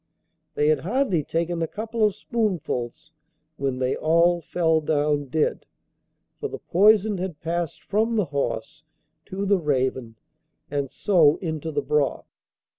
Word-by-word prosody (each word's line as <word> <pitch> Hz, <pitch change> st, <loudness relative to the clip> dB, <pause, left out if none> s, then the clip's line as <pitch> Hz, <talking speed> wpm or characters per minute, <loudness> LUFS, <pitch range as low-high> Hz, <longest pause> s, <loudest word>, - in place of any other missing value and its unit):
They 150 Hz, +1 st, +2 dB
had 155 Hz, -2 st, +3 dB
hardly 195 Hz, -, 0 dB
taken 170 Hz, +2 st, -2 dB
a 165 Hz, -, 0 dB
couple 220 Hz, +3 st, -3 dB
of 210 Hz, -2 st, +3 dB
spoonfuls 160 Hz, -, -3 dB, 0.5 s
when 135 Hz, -2 st, -1 dB
they 130 Hz, 0 st, 0 dB
all 170 Hz, +2 st, +3 dB
fell 160 Hz, 0 st, +1 dB
down 150 Hz, -1 st, +1 dB
dead, 150 Hz, +3 st, -1 dB, 0.7 s
for -, -, -2 dB
the -, -, -7 dB
poison 205 Hz, +1 st, +3 dB
had 180 Hz, -5 st, -4 dB
passed 170 Hz, -1 st, -3 dB
from 220 Hz, +3 st, 0 dB
the 210 Hz, -4 st, +2 dB
horse 140 Hz, -2 st, -3 dB, 0.5 s
to 195 Hz, +2 st, -3 dB
the 200 Hz, -1 st, +3 dB
raven 130 Hz, -6 st, -1 dB, 0.6 s
and 140 Hz, -2 st, -1 dB
so 160 Hz, -5 st, +3 dB
into 160 Hz, -3 st, -4 dB
the -, -, -1 dB
broth. 150 Hz, -2 st, 0 dB
165 Hz, 140 wpm, -24 LUFS, 145-195 Hz, 0.7 s, had